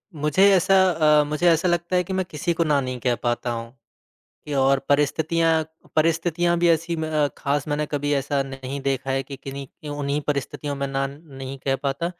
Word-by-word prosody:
मुझे 150 +7 +4
ऐसा 195 +2 +3 0.5
अ, - - +1
मुझे 150 +4 0
ऐसा 165 +3 +3
लगता 175 +1 0
है 180 - +3
कि 190 - -5
मैं 185 -1 0
किसी 160 +3 -1
को 170 - +1
ना 150 -3 +2
नहीं 130 -1 -4
कह 120 0 +1
पाता 120 0 -1
हूँ, 115 +2 -6 0.7
कि 150 - -5
और 135 0 +3
परिस्थितियाँ 160 +3 +2 0.3
परिस्थितियाँ 170 +2 +2
भी 175 0 +3
ऐसी 165 +1 +1
म 155 -2 +1
ख़ास 145 +1 -1
मैंने 150 +1 -1
कभी 145 0 -2
ऐसा 140 0 0
नहीं 135 0 -6
देखा 135 -1 -1
है 135 0 0
कि 135 +1 -9
किन्हीं 135 +1 -7
कि 150 - -13
उन्हीं 145 0 -2
परिस्थितियों 145 0 -2
में 140 0 -2
ना 135 0 -1
नहीं 135 -2 -9
कह 135 -1 +1
पाता, 140 +4 -1
145 Hz, 195 wpm, -23 LUFS, 135-165 Hz, 0.7 s, मुझे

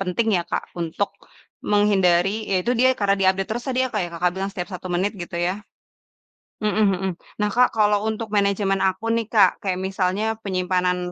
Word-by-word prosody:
penting 195 +4 -1
ya, 175 - 0
Kak? - - -1 0.2
Untuk 170 +4 -2 0.6
menghindari, 195 -3 +3 0.2
ya 190 - +2
itu 245 - +1
dia, 260 +1 +5
karena 200 -1 +2
dia 190 - +4
update 195 0 -3
terus 240 +1 -4
tadi 255 -1 -1
ya, - - -2
Kak? 210 - 0
Yang 170 - -8
Kakak 175 +1 +1
bilang 195 +1 -2
setiap 180 -1 -5
1 185 +1 -7
menit 190 +5 0
gitu, 175 - -7
ya. 180 - +1 1.1
Mhm 210 - +2 0.2
mhm. 190 +1 -2 0.3
Nah, 210 - +2
Kak, 250 +1 +6
kalau 210 -1 +3
untuk 220 0 -4
manajemen 200 -1 +1
akun 225 +5 -1
nih, 225 - -4
Kak, 215 - +7
kayak 190 -4 -1
misalnya 190 +2 -1 0.2
penyimpanan, 180 -1 0
195 Hz, 195 wpm, -22 LUFS, 180-210 Hz, 1.1 s, Kak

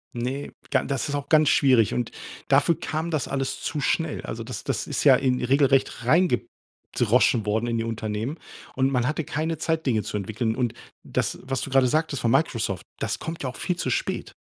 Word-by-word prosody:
Ne, 130 +4 -3 0.2
ga - - +3
das 135 -2 -2
ist - - -3
auch 145 -1 -4
ganz 155 -2 +5
schwierig. 130 -6 +4
Und 120 -2 -2 0.4
dafür 170 - +3
kam 160 +2 -3
das 155 -4 -1
alles 135 -1 -2
zu 155 - -3
schnell. 160 +2 0
Also, 115 +1 -5
das 125 +2 -7
das - - -2
ist - - -2
ja - - +8
in 130 -2 +1
regelrecht 135 0 +2
reingedroschen 125 - +1
worden 110 +3 0
in 115 -1 0
die 115 - -1
Unternehmen. 115 +5 -3 0.4
Und 130 +1 +2
man 125 -2 +1
hatte 155 +3 -1
keine 160 +3 -2
Zeit, 160 0 -1
Dinge 115 -5 +2
zu 105 - -4
entwickeln. 110 +3 -2
Und 120 -2 0 0.3
das, - - -2
was 135 -1 -2
du - - -4
grade 135 -1 +4
sagtest 155 -1 0
von 115 - +2
Microsoft, 115 - 0
das - - -2
kommt 165 -1 -5
ja 130 - -1
auch 125 - -9
viel 180 - -1
zu - - -2
spät. - - -2
130 Hz, 205 wpm, -25 LUFS, 115-150 Hz, 0.4 s, ja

